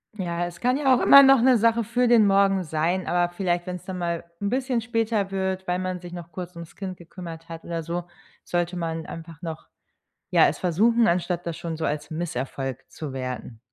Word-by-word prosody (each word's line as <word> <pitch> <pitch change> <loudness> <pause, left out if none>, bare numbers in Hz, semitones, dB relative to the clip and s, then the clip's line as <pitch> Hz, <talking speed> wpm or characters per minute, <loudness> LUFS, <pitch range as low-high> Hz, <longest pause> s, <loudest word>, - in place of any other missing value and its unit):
Ja, 175 -3 -2
es 175 -1 -11
kann 250 +2 +2
ja 270 -3 +4
auch - - 0
immer 280 - +9
noch 270 -2 +6
'ne 255 0 +5
Sache 230 +1 +3
für 245 +3 +1
den 230 -3 +6
Morgen 195 -1 +3
sein, 165 +4 -1
aber 175 0 +1
vielleicht, 175 -1 -1
wenn 180 - -3
es 180 - -10
dann 190 -1 -5
mal 170 -1 -2 0.2
'n 200 - 0
bisschen 255 0 0
später 225 -3 -1
wird, 190 -1 -2
weil 180 0 0
man 185 -1 -3
sich 175 0 -10
noch 175 -1 -8
kurz 180 +1 -7
ums 170 -1 -10
Kind 190 -2 -6
gekümmert 170 -1 -10
hat 165 0 -8
oder 165 -1 -3
so, 170 +2 -3 0.4
sollte 175 +1 -1
man 165 -1 -3
einfach 165 -1 -9
noch, 160 -2 -6 0.6
ja, - - +6
es - - -2
versuchen, 225 +7 +3
anstatt 175 0 0
das 165 -2 -3
schon 165 -1 -5
so 160 - -2
als 150 0 -3
Misserfolg 135 -5 -4
zu 150 -4 -7
werten. 125 -3 -5
175 Hz, 215 wpm, -25 LUFS, 165-200 Hz, 0.6 s, immer